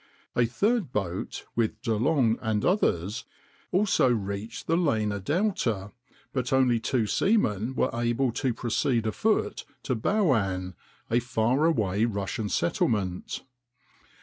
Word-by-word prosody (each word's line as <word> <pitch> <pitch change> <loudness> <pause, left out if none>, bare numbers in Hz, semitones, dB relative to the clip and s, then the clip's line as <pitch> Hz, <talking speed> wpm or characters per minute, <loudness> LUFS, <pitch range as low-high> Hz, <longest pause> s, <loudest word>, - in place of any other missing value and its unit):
A 120 -1 +3
third 200 - 0
boat, 95 -6 -3
with 115 -2 0
De 115 -3 +1
Long 120 -1 +2
and 110 -2 0
others, 110 - +1 0.5
also 185 -8 +3
reached 105 0 -3
the 165 - +2
Lena 110 - +1
delta, 115 - -1 0.4
but 125 -2 -2
only 130 -3 +3
two 120 0 0
seamen 120 - +1
were - - +1
able 120 +2 +1
to 130 +2 0
proceed 115 0 0
afoot 110 -3 0 0.2
to - - -1
Bulun, 110 - +1 0.4
a 120 - +4
far 125 +3 +1
away 110 - +2
Russian 105 -1 -2
settlement. 90 +1 -1
115 Hz, 120 wpm, -27 LUFS, 105-135 Hz, 0.5 s, a